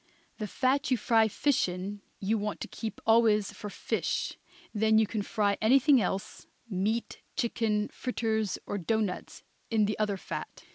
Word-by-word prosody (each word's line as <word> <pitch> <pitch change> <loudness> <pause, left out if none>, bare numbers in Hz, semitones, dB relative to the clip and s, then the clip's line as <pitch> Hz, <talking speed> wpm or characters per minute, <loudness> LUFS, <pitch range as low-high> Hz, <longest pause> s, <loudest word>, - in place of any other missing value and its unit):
The 215 - -2
fat 265 +4 +1
you 255 - +3
fry 225 0 +4
fish 260 -1 +1
in 190 +3 -5 0.2
you 210 +3 0
want 210 0 -3
to - - -3
keep 220 -2 -6
always 220 -2 +4
for 210 - -7
fish; - - -2 0.4
then 220 0 +3
you 220 - +5
can 215 0 -2
fry 200 0 0
anything 265 +3 +5
else, 195 +2 -3 0.2
meat, 215 +3 -2
chicken, 220 -3 0
fritters 220 -5 -1
or 205 - -3
doughnuts, 210 +1 -2 0.3
in 220 -2 +3
the 210 +1 -2
other 210 -2 +1
fat. - - -7
215 Hz, 155 wpm, -29 LUFS, 205-230 Hz, 0.4 s, you